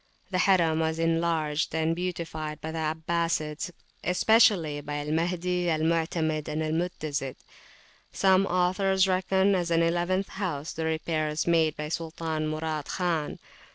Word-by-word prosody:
The 185 - 0
Harim 170 -4 +3
was 160 0 0
enlarged 165 -2 0
and 160 +1 +1
beautified 165 -4 -4
by 160 - -5
the 165 - -4
Abbasides, 160 +1 -1 0.3
especially 180 -6 +3
by 145 0 -4
Al 145 +1 -3
Mahdi, 175 +2 0
Al 155 -1 +1
Mutamid, 160 -1 0
and 155 +1 -2
Al 155 - -1
Mutazid. 155 -5 -2 0.8
Some 190 0 +3
authors 185 +2 +2
reckon, 190 +1 +2
as 175 -2 0
an 165 0 +3
eleventh 175 +3 0
house, 165 -7 -4
the 160 - -3
repairs 155 -1 -1
made 165 -3 +2
by 150 0 -4
Sultan 160 -1 -3
Murad 155 -1 -3
Khan. 170 -5 -1
165 Hz, 140 wpm, -27 LUFS, 155-180 Hz, 0.8 s, Harim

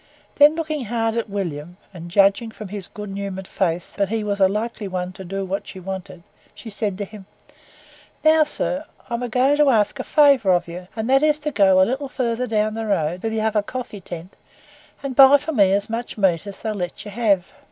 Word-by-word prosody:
Then 295 +2 +7
looking 310 -5 -3
hard 225 0 -1
at 230 -2 -2
William, 175 -4 -5 0.2
and 175 -1 -9
judging 200 +5 +3
from 215 -2 -9
his 200 -2 -5
good 210 -1 -8
humoured 195 -1 -5
face, 175 -2 -2
that 200 -2 -1
he 225 0 -1
was 200 -1 -2
a 190 - +6
likely 210 +1 -3
one 180 -1 -3
to 190 0 -9
do 195 +2 -4
what 190 +2 -4
she 190 - -9
wanted, 185 -2 -7 0.3
she 225 - -9
said 205 -2 -2
to 205 - -3
him. 200 -1 -13 1.0
"Now, 315 0 +6
Sir, 300 0 -3 0.3
I'm 235 +1 -2
agoing 250 +4 +2
to 295 -1 +5
ax 215 -5 +3
a 260 - -3
favour 275 -11 +4
of 175 - +1
you, 180 +2 -8
and 220 0 -3
that 270 +1 +4
is 300 -1 +3
to 300 0 -2
go 195 -6 +4
a 185 - +6
little 265 +4 -3
farther 250 -2 -2
down 215 -1 0
the 225 0 -4
road, 175 -3 0
to 225 - -1
the 220 0 -2
other 215 -1 +1
coffee 240 -2 -7
tent, 175 +1 -9 0.7
and 270 -2 -4
buy 270 +2 +9
for 295 +3 -5
me 200 -9 +4
as 200 +1 +1
much 230 +1 -5
meat 190 -3 +1
as 200 - -9
they'll 220 -1 -2
let 180 +1 -5
you 205 - -7
have. 200 -5 +1
210 Hz, 220 wpm, -22 LUFS, 190-245 Hz, 1.0 s, buy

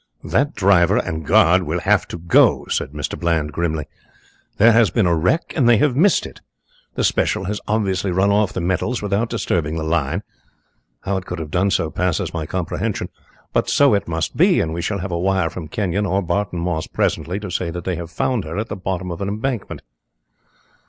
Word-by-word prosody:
"That 140 +5 0
driver 95 -4 +4
and 80 0 -2
guard - - +4
will - - -2
have - - +2
to - - -6
go," 85 0 +3
said - - -1
Mr. 75 0 -5
Bland, 80 -3 0
grimly. 80 -2 -2 0.7
"There 115 +3 +6
has 115 -2 +4
been 115 -5 +1
a 85 -1 +3
wreck 90 - 0
and 125 -7 +3
they 120 - +6
have 135 +2 +2
missed 185 +7 +3
it. - - -11 0.5
The - - -1
special - - +1
has 105 +2 -3
obviously 100 -3 0
run 95 +3 +2
off 105 -1 +2
the 90 - -3
metals 95 +7 -1
without 105 +3 0
disturbing 85 -8 -1
the 80 - -3
line 80 -3 -1 0.8
how 100 0 -1
it 95 - -6
could 90 - -4
have 80 -2 -6
done 95 +5 +2
so 85 -4 0
passes 90 -1 -1
my 80 -3 -3
comprehension 90 0 -3 0.4
but - - +1
so 140 -3 +4
it 100 -3 0
must 80 0 -2
be, - - +4
and 80 -1 -1
we 85 - -3
shall 100 +4 -2
have 95 0 -4
a 85 - -1
wire 95 -2 +1
from 85 -3 -7
Kenyon 100 +3 -1
or 100 +1 0
Barton 90 +1 -1
Moss 85 -2 -2
presently 90 +4 -1
to 100 -3 -7
say 90 0 -2
that 85 +1 -6
they 90 0 -2
have 85 -1 -6
found 115 +6 -1
her 80 +4 -6
at 110 +2 -3
the - - -3
bottom 95 -1 -4
of 85 - -6
an 100 - -2
embankment." 110 +2 -3
90 Hz, 210 wpm, -20 LUFS, 85-105 Hz, 0.8 s, There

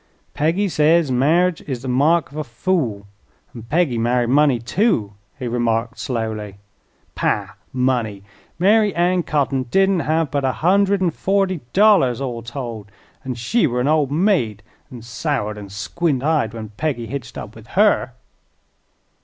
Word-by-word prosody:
"Peggy 170 +7 +1
says 160 -3 +3
marri'ge 160 +7 +2
is 130 -4 -4
the - - -5
mark 145 +6 +2
of 145 - -10
a - - -1
fool; 120 - -2 0.5
an' 115 - -9
Peggy 130 0 0
married 120 +1 +1
money, 145 -2 +4
too," 120 - 0 0.2
he 130 -3 -4
remarked 115 0 -1
slowly. 110 -4 -4 0.6
"Pah! 100 -2 -1 0.2
money! 125 -6 -1 0.3
Mary 205 +3 +3
Ann 175 +1 +2
Cotting 135 -5 -1
didn't 195 +7 +2
hev 160 -2 0
but 140 -1 -1
a 130 -1 +1
hundred 195 +3 +2
an' 175 - +2
forty 190 +1 0
dollars, 190 - +4
all 125 -4 -4
told, 120 -4 -7 0.3
an' 130 -1 -4
she 155 - +1
were 125 -1 -2
an 125 - 0
old 150 -3 +2
maid 150 - +1 0.3
an' 125 -5 -10
soured 115 -2 -2
an' 100 -1 -9
squint 130 - -2
eyed 145 -8 0
when 110 -2 -7
Peggy 120 +2 -3
hitched 130 +2 -7
up - - -7
with - - -14
her." - - +3
135 Hz, 155 wpm, -20 LUFS, 115-170 Hz, 0.6 s, money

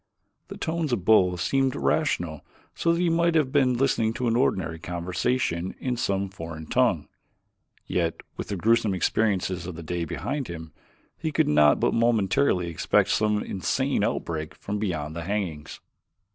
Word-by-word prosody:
The - - -8
tones 160 -3 -2
of 100 -7 -1
both 90 -5 +4
seemed 135 +7 +1
rational 75 +3 0 0.3
so 170 - +1
that 170 - +1
he 180 - +2
might 170 0 +2
have 150 -5 +2
been 130 -3 +3
listening 115 -4 +1
to 125 +1 -2
an 115 - +2
ordinary 85 -10 0
conversation 90 +2 -2
in 125 -1 -1
some 100 -4 -1
foreign 80 -4 -8
tongue. - - +1 0.8
Yet 85 -2 0 0.2
with - - -5
the 100 - -3
gruesome 110 +1 +2
experiences 95 -3 0
of 90 - -6
the 85 - -8
day 85 +1 -2
behind 140 - -3
him, 80 -2 -8 0.5
he 160 -1 -2
could - - +2
not 75 0 +5
but - - +2
momentarily 115 -3 +2
expect 85 - +1
some 105 -1 +1
insane 95 - -1
outbreak 80 -2 -2
from 105 +1 -4
beyond 80 -7 -3
the 85 -1 -5
hangings. 90 -7 -3
95 Hz, 160 wpm, -26 LUFS, 85-125 Hz, 0.8 s, not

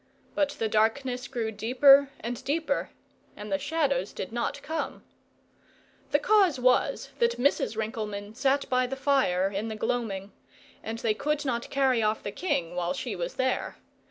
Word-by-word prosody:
But 295 -1 +1
the 225 - 0
darkness 245 +4 0
grew 230 -4 -3
deeper 265 +6 +5
and 240 +2 -5
deeper, 310 +4 -1 0.5
and 210 0 -7
the 195 - +1
shadows 280 - 0
did 190 - -5
not 240 +4 -3
come. 320 +1 -4 1.1
The - - +4
cause 385 -10 +3
was, 250 0 +2
that 470 0 +2
Mrs. 245 -4 +1
Rinkelmann 215 -2 -4
sat 275 +4 +1
by 255 0 +2
the 270 - -4
fire 265 -10 +2
in 205 +3 -3
the 220 - -4
gloaming; 210 -4 -2 0.5
and 225 +1 -5
they 230 -1 +1
could 300 +6 -1
not 240 -3 -2
carry 265 -4 +2
off 215 0 0
the 200 - -4
king 175 - -2
while 180 0 -1
she - - -4
was - - -4
there. 260 0 -1
245 Hz, 160 wpm, -28 LUFS, 215-280 Hz, 1.1 s, deeper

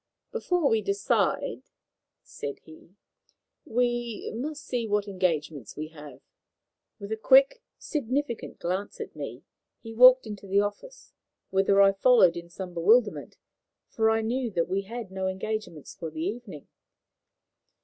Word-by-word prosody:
"Before 360 -9 0
we 225 -3 +2
decide," 200 -1 0 0.6
said 140 -1 -7
he, 160 +3 -17 0.7
"we 240 -1 -1
must 290 +5 -5
see 240 -3 -2
what 205 0 0
engagements 160 - -2
we 155 +1 -5
have." 150 -4 -12 0.8
With 200 +1 -9
a - - +1
quick, 270 - +5 0.2
significant 275 -3 -3
glance 185 +4 -3
at - - -7
me, - - -7 0.4
he 225 -1 -8
walked 255 +2 +7
into 205 -2 -8
the 195 +1 +3
office, 205 - -5 0.4
whither 195 +1 +3
I 195 - +6
followed 195 -3 +5
in 170 0 -8
some 180 0 -8
bewilderment, 205 +6 +2 0.5
for 220 -1 +2
I 225 0 +2
knew 245 +2 -1
that 170 -5 -1
we 190 +2 -1
had 225 0 -7
no 190 0 -2
engagements 190 -4 -5
for 165 - -6
the 155 +1 -5
evening. 200 - -6
205 Hz, 140 wpm, -27 LUFS, 185-240 Hz, 0.8 s, walked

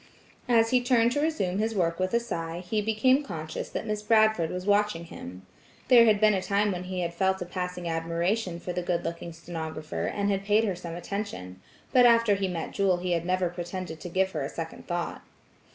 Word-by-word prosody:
As 225 -1 +4
he 250 -1 +4
turned 240 -2 +3
to 290 - 0
resume 205 - 0
his 220 +1 0
work 170 -3 0
with 185 0 0
a - - +4
sigh, 170 -7 -5
he 215 +2 0
became 225 +6 +3
conscious 160 - -6
that - - -4
Miss 210 -1 -2
Bradford 215 -5 +3
was 180 0 -5
watching 205 -4 +2
him. 90 - -10 0.4
There 240 -2 +8
had 215 -2 +4
been 215 0 +5
a 190 - 0
time 200 +2 +1
when 180 -1 -4
he 185 0 -3
had 170 -1 -2
felt 190 +2 +1
a 180 - -4
passing 180 -1 -4
admiration 170 +3 -1
for 180 - -5
the 180 - -2
good 175 -1 -1
looking 170 0 -5
stenographer, 160 -2 -5
and 200 0 0
had 195 0 -1
paid 210 +2 +3
her 200 -4 0
some 170 -1 -7
attention, 165 - -5 0.3
but 250 -1 +7
after 230 -2 +5
he 195 -1 0
met 170 -3 -4
Jewel 195 -2 +2
he 180 0 -3
had 170 0 0
never 185 -1 +1
pretended 175 -1 -6
to 175 - -7
give 190 +2 +1
her 155 - -3
a 135 - -3
second 165 -1 -7
thought. 175 0 -3
185 Hz, 215 wpm, -27 LUFS, 170-215 Hz, 0.4 s, There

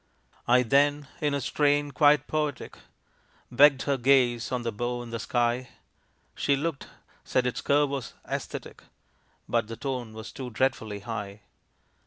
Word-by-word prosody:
I 125 +1 +5
then, 145 +3 +2
in 145 -3 0
a - - 0
strain 145 +1 +1
quite 145 +1 +4
poetic, 150 -4 -3 0.8
Begged 140 -2 +6
her 140 -1 0
gaze 125 -2 +3
on 125 -1 -1
the 115 - -2
bow 120 +3 -3
in 120 - -10
the 115 - -3
sky, 120 +1 0 0.6
She 140 - +1
looked 150 0 -3 0.4
said 130 - 0
its 125 - -2
curve 145 0 +2
was 140 -3 -5
"æsthetic." - - -5 0.7
But 115 -2 0
the 115 0 -7
"tone 125 -5 -4
was 110 0 -8
too 130 -2 -7
dreadfully 110 -4 -1
high." 105 -2 -6
130 Hz, 150 wpm, -27 LUFS, 120-145 Hz, 0.8 s, Begged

